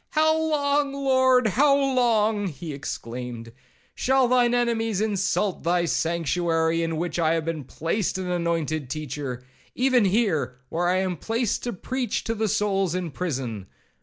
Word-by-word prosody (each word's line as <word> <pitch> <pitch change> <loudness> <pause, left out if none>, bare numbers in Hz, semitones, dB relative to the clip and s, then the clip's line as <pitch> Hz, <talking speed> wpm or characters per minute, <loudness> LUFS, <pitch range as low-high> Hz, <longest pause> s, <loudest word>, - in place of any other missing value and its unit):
'How 315 0 +4
long, 290 -3 +1
Lord, 260 -2 +3
how 275 +7 +4
long,' 230 -7 +2
he 155 -1 -6
exclaimed, 120 -3 -6 0.4
'shall 265 0 +2
thine 245 -1 +3
enemies 225 -4 0
insult 205 -2 0
thy 175 +1 +1
sanctuary, 165 0 0
in 165 -1 -1
which 175 +1 -2
I 165 0 +3
have 160 -1 -2
been 165 -3 -3
placed 165 - -2
an 185 -1 -3
anointed 165 -5 -1
teacher? 140 -4 -5 0.3
even 255 -3 +3
here, 180 - +1
where 175 +2 0
I 180 +1 +2
am 185 -2 -1
placed 225 - -1
to 240 - -1
preach 245 +4 -3
to 225 - -1
the 220 0 -1
souls 195 -3 0
in 180 -3 -3
prison? 130 - -4
185 Hz, 150 wpm, -25 LUFS, 160-240 Hz, 0.4 s, How